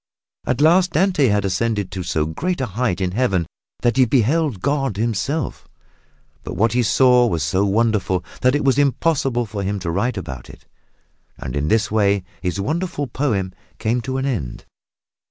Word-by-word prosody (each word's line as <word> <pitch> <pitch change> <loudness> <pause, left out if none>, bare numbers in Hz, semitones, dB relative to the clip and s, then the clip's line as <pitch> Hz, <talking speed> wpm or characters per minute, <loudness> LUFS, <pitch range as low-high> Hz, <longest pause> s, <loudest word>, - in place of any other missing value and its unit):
At 130 +2 0
last 175 +3 +4
Dante 175 -5 +3
had 105 -2 +1
ascended 105 0 -1
to 95 - -4
so 80 -3 -1
great 175 - -2
a 130 - 0
height 110 -3 -1
in 90 -2 -1
Heaven 95 -6 +1 0.4
that 120 0 +2
he 130 - +6
beheld 135 - +1
God 135 -2 -1
Himself 120 +7 -2 0.8
but - - -6
what 115 +2 +2
he 125 - +2
saw 125 +2 +4
was 85 -7 -1
so 95 +7 +1
wonderful 100 -3 +1 0.2
that 130 +2 +3
it 145 - -1
was 135 +1 +3
impossible 135 -3 +1
for 105 -2 -5
him 100 +1 -2
to 85 -2 -2
write 110 +6 -1
about 65 -9 -7
it, - - -14 0.7
and 65 - -6
in 70 +1 -1
this 110 +3 +1
way 100 -3 +2 0.2
his 90 0 -2
wonderful 155 - -2
poem 105 -10 -2 0.2
came 120 +3 0
to 130 +2 -3
an 135 - -1
end. 100 - -3
115 Hz, 175 wpm, -20 LUFS, 95-135 Hz, 0.8 s, he